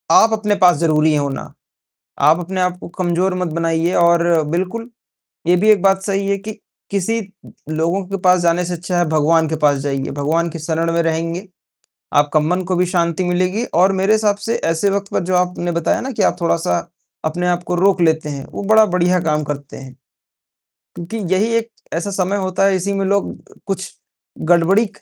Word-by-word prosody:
आप 225 Hz, 0 st, +5 dB
अपने 210 Hz, -1 st, 0 dB
पास 180 Hz, -3 st, +5 dB
ज़रूरी 155 Hz, -1 st, +2 dB
हैं 150 Hz, -, +2 dB
होना। 140 Hz, -1 st, -4 dB, 0.7 s
आप 155 Hz, +4 st, +4 dB
अपने 185 Hz, +2 st, -3 dB
आप 180 Hz, 0 st, 0 dB
को -, -, -9 dB
कमज़ोर 180 Hz, +1 st, +1 dB
मत 180 Hz, -1 st, -2 dB
बनाइए 165 Hz, +1 st, 0 dB
और 170 Hz, 0 st, +4 dB, 0.3 s
बिल्कुल 190 Hz, +8 st, -3 dB, 0.6 s
ये 175 Hz, -, +5 dB
भी 215 Hz, +4 st, +2 dB
एक 210 Hz, -4 st, +5 dB
बात 195 Hz, -1 st, +3 dB
सही 195 Hz, 0 st, -1 dB
है 200 Hz, 0 st, +1 dB
कि 215 Hz, +3 st, -7 dB, 0.4 s
किसी 200 Hz, +4 st, 0 dB, 0.2 s
उ -, -, -14 dB, 0.2 s
लोगों 170 Hz, +5 st, 0 dB
के 195 Hz, 0 st, -3 dB
पास 180 Hz, 0 st, +4 dB
जाने 170 Hz, +1 st, +2 dB
से 175 Hz, -, -3 dB
अच्छा 175 Hz, +1 st, -3 dB
है 175 Hz, -, +2 dB
भगवान 160 Hz, +1 st, +2 dB
के 160 Hz, -, -1 dB
पास 145 Hz, -1 st, +3 dB
जाइए। 135 Hz, -1 st, -3 dB
भगवान 160 Hz, +4 st, 0 dB
के 165 Hz, 0 st, -7 dB
शरण 165 Hz, +1 st, -1 dB
में 170 Hz, -, +2 dB
रहेंगे, 165 Hz, +4 st, -2 dB, 0.7 s
आपका 145 Hz, +1 st, +3 dB
मन 175 Hz, +5 st, 0 dB
को 185 Hz, +1 st, -2 dB
भी 180 Hz, +1 st, +2 dB
शांति 170 Hz, 0 st, 0 dB
मिलेगी 185 Hz, +5 st, 0 dB
और 185 Hz, +3 st, +4 dB
मेरे 195 Hz, +3 st, +2 dB
हिसाब 215 Hz, -2 st, +2 dB
से 230 Hz, -, 0 dB, 0.2 s
ऐसे 165 Hz, +5 st, +1 dB
वक़्त 200 Hz, 0 st, -2 dB
पे -, -, +2 dB
जो 185 Hz, 0 st, 0 dB
आपने 180 Hz, -1 st, 0 dB
बताया 170 Hz, -1 st, 0 dB
ना 265 Hz, -, -4 dB
कि 245 Hz, -, -1 dB
आप -, -, +2 dB
थोड़ा-सा 165 Hz, -, +1 dB, 0.5 s
अपने 175 Hz, +3 st, -1 dB
आप 175 Hz, 0 st, 0 dB
को 180 Hz, -, -2 dB
रोक 190 Hz, 0 st, +2 dB
लेते 160 Hz, -2 st, +2 dB
हैं, 140 Hz, -1 st, -6 dB
वो -, -, -6 dB
बड़ा 220 Hz, +1 st, +5 dB
बढ़िया 180 Hz, -1 st, +1 dB
काम 155 Hz, -2 st, 0 dB
करते 145 Hz, -1 st, -6 dB
हैं। 130 Hz, -1 st, -11 dB, 1.0 s
क्योंकि 175 Hz, +6 st, -6 dB, 0.2 s
यही 215 Hz, +5 st, +1 dB
एक 230 Hz, 0 st, -2 dB, 0.3 s
ऐसा 175 Hz, +4 st, -2 dB
समय 190 Hz, 0 st, -1 dB
होता 190 Hz, -1 st, 0 dB
है, 195 Hz, -1 st, +3 dB
इसी 195 Hz, +2 st, -2 dB
में 195 Hz, 0 st, -1 dB
लोग 200 Hz, 0 st, 0 dB, 0.2 s
अ, -, -, -18 dB
कुछ 195 Hz, -1 st, -4 dB, 0.6 s
गड़बड़ी 175 Hz, +5 st, +4 dB
ए -, -, -6 dB
180 Hz, 205 wpm, -18 LUFS, 165-195 Hz, 1.0 s, आप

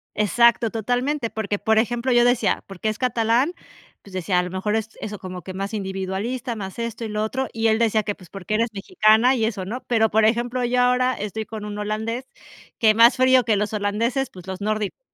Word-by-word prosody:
Exacto, 230 Hz, +3 st, +3 dB
totalmente, 245 Hz, +4 st, -1 dB
porque, 205 Hz, -2 st, -3 dB
por 220 Hz, 0 st, +2 dB
ejemplo, 240 Hz, +3 st, +1 dB
yo 240 Hz, 0 st, +5 dB
decía, 245 Hz, 0 st, +2 dB
porque 195 Hz, +2 st, -3 dB
es 215 Hz, -, -3 dB
catalán, 245 Hz, +4 st, +1 dB, 0.5 s
pues 200 Hz, -, -16 dB
decía, 185 Hz, 0 st, 0 dB
a -, -, +1 dB
lo 180 Hz, -, -5 dB
mejor 190 Hz, +3 st, -2 dB
es 220 Hz, 0 st, -2 dB
eso 210 Hz, -1 st, -5 dB
como 185 Hz, -1 st, -7 dB
que 185 Hz, -, -7 dB
más 195 Hz, +3 st, -4 dB
individualista, 200 Hz, +5 st, -3 dB
más 195 Hz, 0 st, -7 dB
esto, 230 Hz, 0 st, -4 dB
y 220 Hz, -, -5 dB
lo 210 Hz, 0 st, -1 dB
otro, 260 Hz, +3 st, -2 dB
y 225 Hz, 0 st, +1 dB
él 220 Hz, 0 st, +3 dB
decía 220 Hz, -2 st, +2 dB
que 205 Hz, 0 st, -3 dB
pues 180 Hz, -3 st, -16 dB
porque 195 Hz, +3 st, -4 dB
eres 230 Hz, +2 st, +1 dB
mexicana, 220 Hz, -, +3 dB
y 225 Hz, -2 st, +1 dB
eso 205 Hz, -5 st, -3 dB
¿no? 240 Hz, +7 st, -5 dB
Pero 220 Hz, -2 st, +3 dB
por 220 Hz, +1 st, +3 dB
ejemplo, 240 Hz, +3 st, 0 dB
yo 245 Hz, +1 st, +1 dB
ahora 250 Hz, +1 st, +3 dB
estoy 210 Hz, 0 st, -5 dB
con 215 Hz, -2 st, -7 dB
un 210 Hz, 0 st, -6 dB
holandés, 220 Hz, +4 st, -3 dB, 0.5 s
que 220 Hz, -3 st, +5 dB
más 230 Hz, +3 st, +6 dB
frío 260 Hz, 0 st, +5 dB
que 220 Hz, -1 st, +2 dB
los 210 Hz, +2 st, -2 dB
holandeses, 230 Hz, +6 st, -1 dB
pues 180 Hz, 0 st, -13 dB
los 190 Hz, +1 st, -6 dB
nórdicos. 215 Hz, -, -2 dB
220 Hz, 220 wpm, -23 LUFS, 205-240 Hz, 0.5 s, más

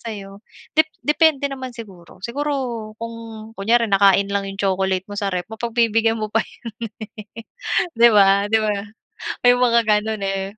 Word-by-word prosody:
sa'yo 200 Hz, -3 st, -8 dB, 0.3 s
dep 315 Hz, 0 st, +4 dB, 0.2 s
depende 300 Hz, -1 st, +3 dB
naman 260 Hz, -1 st, -6 dB
siguro. 190 Hz, -7 st, -12 dB
Siguro 290 Hz, +5 st, -2 dB, 0.5 s
kung 230 Hz, +1 st, -6 dB, 0.4 s
kunyari 230 Hz, +3 st, +2 dB
nakain 195 Hz, 0 st, +5 dB
lang 200 Hz, -1 st, -1 dB
'yong 195 Hz, -, -7 dB
chocolate 190 Hz, -1 st, 0 dB
mo 205 Hz, +1 st, -6 dB
sa 200 Hz, -, -1 dB
ref, 180 Hz, -2 st, -2 dB
mapagbibigyan 225 Hz, 0 st, +1 dB
mo 215 Hz, -1 st, -4 dB
pa 225 Hz, -, +3 dB
yon 230 Hz, -1 st, -9 dB, 0.5 s
eh, 230 Hz, -, -8 dB, 0.5 s
'di 235 Hz, 0 st, +7 dB
ba, 200 Hz, -1 st, +4 dB
'di 220 Hz, -, +3 dB
ba, 215 Hz, -1 st, 0 dB, 0.7 s
may 245 Hz, 0 st, +7 dB
mga 235 Hz, -2 st, +4 dB
gano'n 215 Hz, -1 st, 0 dB
eh. 195 Hz, 0 st, -1 dB
220 Hz, 160 wpm, -21 LUFS, 195-235 Hz, 0.7 s, di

